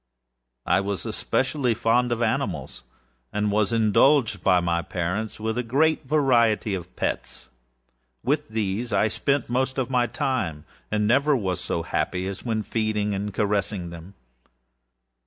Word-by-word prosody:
I - - +3
was 100 -1 -3
especially 130 -3 0
fond 120 +3 +2
of 120 0 0
animals, 110 - -2 0.5
and 105 0 0
was 105 +1 +2
indulged 115 - +3
by 90 +3 +4
my 85 -1 0
parents 95 +7 -3
with 110 +2 -2
a - - +2
great 140 +5 +1
variety 120 -8 +3
of 90 -2 -6
pets. 65 - -4 0.7
With 145 +4 0
these 110 +2 -2
I - - +3
spent 140 +4 0
most 130 +2 -1
of 130 -1 -1
my 125 -1 +2
time, 110 - -2 0.2
and 105 0 +1
never 140 +6 +3
was 95 -5 -2
so 85 - -2
happy 90 +3 -2
as 100 -1 -6
when 110 -3 -1
feeding 105 -1 -1
and 100 +1 -3
caressing 100 -3 -1
them. 85 +4 -11
110 Hz, 145 wpm, -25 LUFS, 100-125 Hz, 0.7 s, by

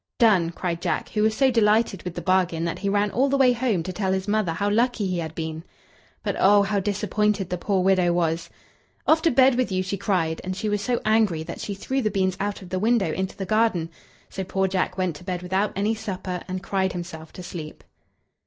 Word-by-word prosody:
"Done!" 200 -8 +4
cried 170 0 -3
Jack, 170 -4 -1
who 210 - -1
was 215 0 +2
so 270 -1 +4
delighted 215 -3 +2
with 180 -1 -6
the 175 - -5
bargain 180 -2 +1
that 170 - -3
he 200 - -1
ran 205 0 +1
all 270 +4 +2
the 275 - +2
way 255 -2 +5
home 230 -8 0
to 185 - -5
tell 190 0 -1
his 190 +1 -2
mother 210 -4 +1
how 200 +5 -1
lucky 230 +1 +1
he 185 -2 -1
had 160 -1 -5
been. 160 0 -4 0.6
But - - -1
oh! 200 +1 +6
how 200 0 0
disappointed 205 -1 0
the 180 - -2
poor 190 0 0
widow 185 -2 +3
was. 165 -1 0 0.6
"Off 315 0 +4
to 330 - +3
bed 265 0 +5
with 250 -3 0
you!" 185 0 0
she 190 +2 -3
cried; 175 -5 0
and 185 0 -3
she 210 +3 -2
was 205 -1 0
so 240 +3 -1
angry 215 -7 +2
that 170 - -7
she 200 - -4
threw 265 +7 -2
the 215 - +1
beans 190 -2 0
out 205 0 -3
of 180 - -11
the 185 0 -2
window 215 -5 +2
into 190 +1 -3
the 195 - -3
garden. 215 -6 +1 0.4
So 190 - -5
poor 190 +1 0
Jack 185 0 -1
went 180 -5 -1
to - - -14
bed 180 -1 -4
without 190 +3 0
any 205 +3 +1
supper, 190 -4 -4
and 185 0 -4
cried 190 -1 0
himself 170 -3 -7
to 180 - -9
sleep. 160 -3 -8
190 Hz, 235 wpm, -24 LUFS, 180-215 Hz, 0.6 s, oh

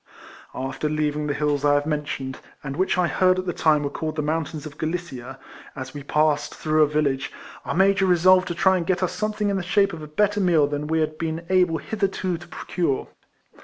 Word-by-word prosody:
After 135 +3 -3
leaving 150 0 -1
the 145 - 0
hills 145 -1 0
I 145 0 +4
have 145 0 +1
mentioned, 145 -3 -3 0.2
and 135 -1 -5
which 185 +3 +1
I 180 - +3
heard 185 +1 +3
at 185 - -2
the 175 - -2
time 150 -2 +3
were 140 - -1
called 155 0 -4
the 155 - -1
Mountains 155 0 -2
of 150 0 -10
Galicia, 155 -6 -4 0.4
as 130 0 -7
we 145 - -6
passed 150 +1 +1
through 155 0 +1
a 150 - +6
village, 140 -3 0 0.3
our - - -2
Major 195 +1 +4
resolved 185 +1 +5
to 175 - -3
try 190 +2 +4
and 170 -2 -3
get 185 0 +1
us 180 - 0
something 210 +2 -1
in 200 - 0
the - - -1
shape 195 +2 +2
of 165 - -7
a 150 - -7
better 205 +7 +1
meal 170 -6 +4
than 145 +1 -3
we 160 0 +1
had 155 0 -2
been 165 0 -3
able 180 -3 +3
hitherto 195 -4 -2
to 175 - -12
procure. 165 -7 -2
160 Hz, 220 wpm, -24 LUFS, 150-185 Hz, 0.4 s, a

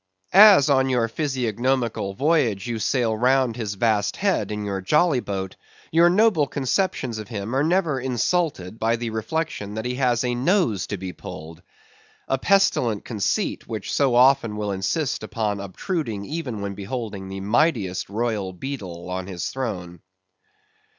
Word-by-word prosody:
As 195 -7 +8
on 135 -2 +3
your 120 -3 +2
physiognomical 120 -5 -1
voyage 130 - +1
you 120 -2 -3
sail 115 -1 +1
round 125 +1 +2
his 110 -4 -4
vast 105 -1 +1
head 195 - 0
in 105 0 -3
your 100 -1 -3
jolly 150 - +3
boat, 95 -4 -4 0.4
your 170 +2 +5
noble 185 -6 +3
conceptions 130 - -1
of 110 - -7
him 110 +1 -4
are 135 - +2
never 160 -4 +1
insulted 125 - -1
by 115 +1 +2
the 115 -1 -4
reflection 110 -2 -3
that 110 +1 -4
he 125 - -1
has 125 -2 +1
a 125 -1 0
nose 125 - +1
to 100 - -4
be 95 0 -6
pulled. 80 +2 -10 0.7
A 135 - 0
pestilent 130 - +2
conceit, 105 -5 -2
which - - -5
so 135 -4 +2
often 125 -4 +4
will 105 -1 -2
insist 115 - -1
upon 110 -1 -2
obtruding 105 - -4
even 135 -8 -4
when 100 0 -3
beholding 100 -1 -5
the 95 0 -6
mightiest 105 - +1
royal 105 -3 -2
beadle 90 -6 -6
on 90 0 -4
his 90 -3 -4
throne. 90 -10 -5
115 Hz, 155 wpm, -23 LUFS, 100-135 Hz, 0.7 s, As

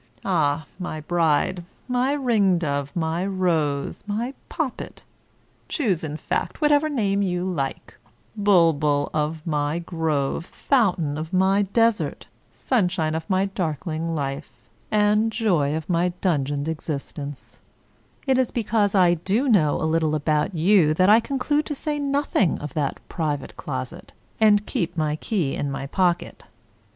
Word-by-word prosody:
— 120 - -27
^Ah, 160 -4 +1
my 175 -4 -4
bride, 165 +2 +1 0.2
my 255 +3 +1
ringdove, 180 - +1
my 165 +1 -1
rose, 170 -7 -1
my 230 +6 -2 0.2
poppet - - -4 0.3
— - - -38
choose, 205 - 0
in 155 -1 -4
fact, - - -3
whatever 295 0 +3
name 200 -8 0
you 180 -2 -1
like 145 -8 -3 0.2
— - - -37
^bulbul 160 -7 +3
of 155 +1 -2
my 150 -1 0
grove, 160 -4 -1
fountain 180 - 0
of 160 +2 -6
my 190 +2 +3
desert, 225 +2 +1 0.3
sunshine 180 -10 0
of 160 0 -4
my 190 0 +2
dark 180 -5 -3
ling 165 0 -2
life, 140 0 -4 0.4
and 210 +1 +3
joy 175 -11 +1
of 160 -1 -4
my 175 0 +2
dungeoned 145 -4 0
existence, 145 -3 -6 0.7
it 265 -2 +3
is 255 - +2
because 215 -3 0
I 180 -2 +5
do 200 - 0
know 175 - +3
a - - -3
little 160 -1 +1
about 150 +4 0
you 165 -2 +4
that 185 +4 +5
I 220 - +8
conclude 280 +4 -1
to 295 - -3
say 295 +1 -3
nothing 280 - +1
of 145 -2 -7
that 145 -3 -1
private 150 -4 -3
closet, 130 -3 -6 0.3
and 210 -1 +4
keep 170 0 -2
my 155 -1 0
key 165 -7 -1
in 145 - -2
my 135 0 -4
pocket. 175 +3 -1
175 Hz, 145 wpm, -23 LUFS, 150-205 Hz, 0.7 s, I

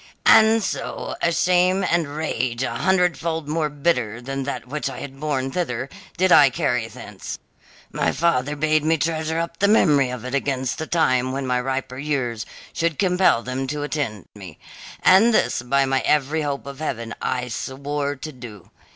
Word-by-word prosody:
"And 220 0 +6
so, - - -4
a 170 - +2
shame 180 +2 +2
and 170 -5 0
rage 130 -6 -2
a - - -1
hundredfold 170 -4 0
more 155 0 0
bitter 140 -7 0
than 135 +2 -4
that 140 - -5
which 150 +3 -3
I - - -7
had 135 -1 -9
borne 135 -3 -1
thither 135 -7 -2 0.3
did 185 0 +2
I 140 -4 +8
carry 125 -2 -1
thence. 105 -4 -8 0.5
My - - 0
father 150 -4 +1
bade 155 +1 +1
me 160 +1 +2
treasure 160 +1 -1
up 170 0 -3
the 200 - +4
memory 150 - +4
of 125 -1 -6
it 130 - -5
against 135 -2 -1
the 160 - -4
time 130 -6 +2
when 135 0 -3
my 125 -1 0
riper 130 0 -3
years 130 -6 -2 0.3
should 165 -3 -1
compel 180 -10 +3
them 130 +1 -3
to 145 +1 -3
attend 140 -9 -3
me, 95 -6 -11 0.5
and 215 +5 +6
this, - - +1
by 135 +3 +2
my 135 0 +1
every 150 +3 +1
hope 140 -2 -3
of 140 0 -8
heaven, 115 -7 -4
I 125 -1 -1
swore 140 +4 -3
to 155 +3 -7
do. 120 - -12
140 Hz, 175 wpm, -22 LUFS, 130-160 Hz, 0.5 s, I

